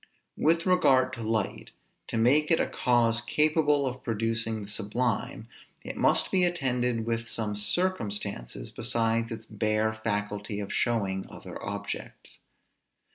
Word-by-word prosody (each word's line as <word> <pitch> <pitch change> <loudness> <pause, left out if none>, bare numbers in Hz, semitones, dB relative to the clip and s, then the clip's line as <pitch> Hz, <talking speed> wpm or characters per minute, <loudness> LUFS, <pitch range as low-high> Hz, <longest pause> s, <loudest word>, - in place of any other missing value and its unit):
With 165 +2 +3
regard 135 -9 +4
to 115 - -6
light, 110 -2 -2 0.4
to - - -3
make 140 +7 +4
it 165 - +4
a - - +2
cause 120 -2 +2
capable 150 +3 +2
of 130 0 -4
producing 115 -1 -1
the - - -9
sublime, 110 +3 -2 0.4
it - - -5
must - - +2
be 185 -1 +3
attended 125 -9 0
with 115 0 -2
some 105 -2 -1
circumstances, 105 - -2
besides 115 0 +1
its 110 -1 -6
bare 110 0 0
faculty 105 -1 -3
of 100 -1 -4
showing 100 -6 0
other - - -9
objects. - - -6
115 Hz, 130 wpm, -28 LUFS, 110-130 Hz, 0.4 s, regard